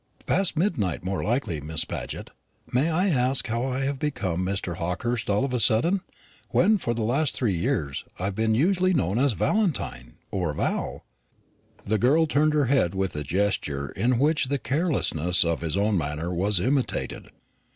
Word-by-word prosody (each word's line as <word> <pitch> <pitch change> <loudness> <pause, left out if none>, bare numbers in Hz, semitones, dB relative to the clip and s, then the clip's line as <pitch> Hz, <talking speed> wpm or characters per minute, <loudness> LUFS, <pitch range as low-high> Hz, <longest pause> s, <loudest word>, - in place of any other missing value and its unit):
"Past 195 -4 +1
midnight 130 - 0
more 95 +1 -2
likely, 110 - -1
Miss 80 +2 -2
Paget. - - -6 0.4
May 135 +7 +2
I 180 +5 +2
ask 130 -3 +2
how 115 +1 -1
I 130 0 -2
have 135 0 -1
become 95 - -1
Mr. 95 -3 -3
Hawkehurst 105 +8 -2
all 105 +6 +2
of 135 - -4
a 125 - +1
sudden, 165 - +3 0.5
when 210 +3 +3
for 120 -8 -1
the 115 - -2
last 135 +7 +1
three 115 -6 0
years 85 - -1
I 95 - -3
have 100 - -1
been 110 +2 +1
usually 185 - +2
known 105 - +1
as 135 -2 +3
Valentine 105 - -1 0.2
or 85 -6 -1
Val?" - - -2 0.8
The 110 +1 +1
girl 145 +8 +4
turned 150 0 +2
her 145 -2 +3
head 125 -9 +2
with 95 -2 -1
a 75 - -2
gesture 75 -4 -1
in 125 +1 +1
which 150 +1 +2
the 140 +2 0
carelessness 125 - +1
of 85 -1 -1
his 80 +1 -1
own 100 -1 +2
manner 80 +4 -3
was 95 +2 +2
imitated. 130 +6 -1
115 Hz, 175 wpm, -25 LUFS, 90-140 Hz, 0.8 s, girl